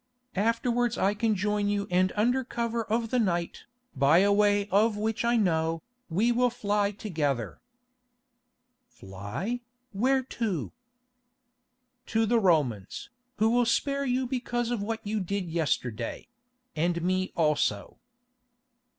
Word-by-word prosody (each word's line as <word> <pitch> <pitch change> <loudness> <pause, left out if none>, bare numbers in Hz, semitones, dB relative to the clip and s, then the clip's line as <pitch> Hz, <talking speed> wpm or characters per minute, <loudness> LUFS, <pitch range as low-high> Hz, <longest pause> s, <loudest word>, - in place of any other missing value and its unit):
Afterwards 235 +3 +1
I 195 +1 +2
can 215 +1 +1
join 205 +1 0
you 205 -1 0
and 185 +1 +3
under 245 +5 +2
cover 235 -1 -2
of 225 +1 -1
the 250 - +2
night, 175 -6 -1 0.3
by 140 +4 +4
a 200 +2 +4
way 205 0 +3
of 210 +2 +3
which 220 +2 -1
I 235 0 +3
know, 165 -5 +1 0.3
we 210 +9 +2
will 245 +1 +3
fly 205 -3 0
together." 155 - -3 1.3
"Fly? 110 - -5 0.3
Where 260 +6 +2
to?" 220 - -3 1.4
"To 225 0 +1
the 235 +2 +3
Romans, 155 - 0 0.2
who 220 +1 +2
will 240 0 +3
spare 280 +4 +1
you 255 0 0
because 240 -1 -2
of 235 -4 -1
what 225 +2 -4
you 210 +1 -1
did 190 -2 -3
yesterday—and 170 - -3
me 185 +1 0
also." 150 -10 0
205 Hz, 125 wpm, -28 LUFS, 170-235 Hz, 1.4 s, by